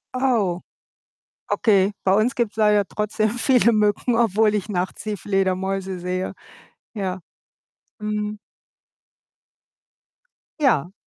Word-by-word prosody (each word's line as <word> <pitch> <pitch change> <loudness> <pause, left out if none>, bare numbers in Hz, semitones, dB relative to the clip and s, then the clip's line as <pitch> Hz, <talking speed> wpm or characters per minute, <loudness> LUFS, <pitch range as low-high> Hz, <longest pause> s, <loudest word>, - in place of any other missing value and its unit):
Oh, 230 -9 +1 0.9
okay. 200 -3 +3
Bei 190 - +4
uns 215 +5 +2
gibt's 235 -3 -1
leider 210 -2 +3
trotzdem 215 +1 -1
viele 245 0 +3
Mücken, 210 +3 +1
obwohl 220 -2 +3
ich 210 0 -3
nachts 185 -2 -3
die 210 -1 -3
Fledermäuse 190 -1 -1
sehe. 180 +1 -3 0.6
Ja, 190 -4 -3 0.8
mhm. 210 0 -3 2.2
Ja. 190 - +2
210 Hz, 100 wpm, -22 LUFS, 190-220 Hz, 2.2 s, Bei